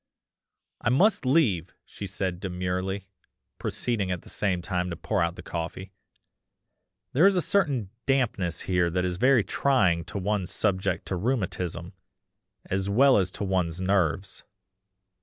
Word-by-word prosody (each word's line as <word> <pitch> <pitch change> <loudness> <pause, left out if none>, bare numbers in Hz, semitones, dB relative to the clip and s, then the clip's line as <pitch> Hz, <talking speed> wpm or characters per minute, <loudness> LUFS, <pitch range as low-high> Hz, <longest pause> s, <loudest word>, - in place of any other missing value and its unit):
"'I - - +1
must 155 - +3
leave!' 115 - +2
she 100 - -7
said 95 -2 -3
demurely, 95 +1 -3 0.5
proceeding 110 -6 -1
at 90 -2 -3
the - - -13
same 95 -4 -1
time 90 -1 -1
to 85 - -4
pour 100 +3 -1
out 85 +1 0
the 90 - -10
coffee, 90 +3 -5 1.2
'there 160 +9 +6
is 200 - +3
a - - +3
certain 145 - 0 0.2
dampness 115 -10 +1
here 90 -2 +1
that 90 +2 0
is 90 -1 -2
very 125 +1 +4
trying 95 -13 +2
to - - -6
one 100 -1 -1
subject 95 -3 0
to 95 - -2
rheumatism, 90 -5 -2 0.7
as 95 +1 -1
well 130 +4 +5
as 90 -2 0
to 90 - -6
one's 90 -3 0
nerves. 95 0 0
95 Hz, 145 wpm, -27 LUFS, 90-115 Hz, 1.2 s, there